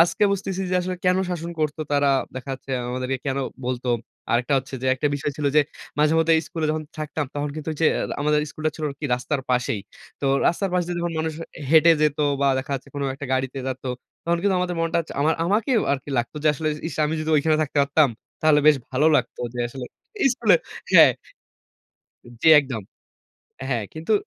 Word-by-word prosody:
আজকে 170 +5 +4
বুঝতেছি 195 -1 -3
যে - - 0
আসলে 180 +1 -3
কেন 180 0 +4
শাসন 170 -1 -4
করতো, 155 +1 -1
তারা 145 -1 +3 0.3
দেখা 130 +1 -6
যাচ্ছে 135 +1 -12 0.2
আমাদেরকে 130 +1 -2
কেন 135 0 0 0.3
বলতো? 125 0 -3 0.4
আরেকটা 125 +4 +2
হচ্ছে 135 +1 -7
যে, - - -1
একটা 130 +3 -1
বিষয় 145 0 -2
ছিল 150 - -1
যে, - - +8 0.4
মাঝেমধ্যে 160 +2 +4
স্কুলে 160 -2 -2
যখন 155 0 -2 0.2
থাকতাম, 155 0 -3
তখন 145 0 -2
কিন্তু 155 0 -6
ঐযে 160 +1 +2 0.3
আমাদের 150 +1 +2
স্কুলটা 155 +1 -2
ছিল 155 - -4
আরকি 140 +2 -9
রাস্তার 135 +3 -2
পাশেই। 125 -4 0 0.4
তো 140 - -1 0.2
রাস্তার 190 +3 +1
পাশে 180 -1 +1
দিয়ে 175 0 -3
যখন 170 0 -2
মানুষ 160 0 -2 0.4
হেঁটে 165 +1 +7
যেত 150 -1 +2 0.2
বা 140 - +3
দেখা 140 +2 -4
যাচ্ছে 135 +1 -6
কোন 145 - -3
একটা 140 0 -7
গাড়িতে 130 +1 -1
যেত। 130 0 -5 0.4
তখন 170 0 +1
কিন্তু 200 -2 +2
আমাদের 180 -1 -2
মনটা, 165 0 +1 0.2
আমা 155 - +3 0.2
আমাকেও 220 +5 +2
আরকি 140 +1 -4
লাগতো 120 +5 -3
যে, - - +5
আসলে 155 +2 -2 0.2
"ইস! - - -7
আমি 155 - -2
যদি 155 - -2
ওইখানে 155 +1 +3
থাকতে 150 -1 -5
পারতাম, 145 +1 +3 0.3
তাহলে 155 -1 +4
বেশ 150 -2 +7
ভালো 135 +4 +2
লাগতো" - - -2
যে 120 - -3
আসলে 130 +1 -7 0.5
স্কুলে - - +4 0.4
হ্যাঁ। - - +8 1.3
জি, 160 - +5
একদম। 130 -7 -5 0.9
হ্যাঁ, 120 -5 -1
কিন্তু 160 +7 -2
150 Hz, 190 wpm, -23 LUFS, 135-165 Hz, 1.3 s, যে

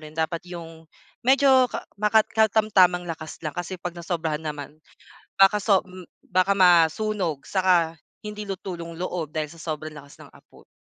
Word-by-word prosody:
rin 155 0 -12
dapat 165 +1 -1
yung 165 -2 -10 0.3
medyo 260 0 +4
ka - - -6 0.2
makat 215 +1 +4
katamtamang 205 -5 +3
lakas 160 -2 -7
lang 155 - -3
kasi 175 +3 -5
'pag 175 0 -6
nasobrahan 165 -3 -3
naman, 150 -1 -7 0.6
baka 195 +1 +5
so 200 -3 +4
m 185 0 -11 0.2
baka 185 +2 +1
masunog 180 0 +3
saka 180 -4 +2 0.3
hindi 210 0 -7
luto 195 -2 -6
yung 170 -1 -8
loob 175 -4 -4
dahil 155 -1 -2
sa 165 0 -13
sobrang 155 -1 -5
lakas 140 -1 -13
ng - - -13
apo - - -20
175 Hz, 160 wpm, -24 LUFS, 160-195 Hz, 0.6 s, baka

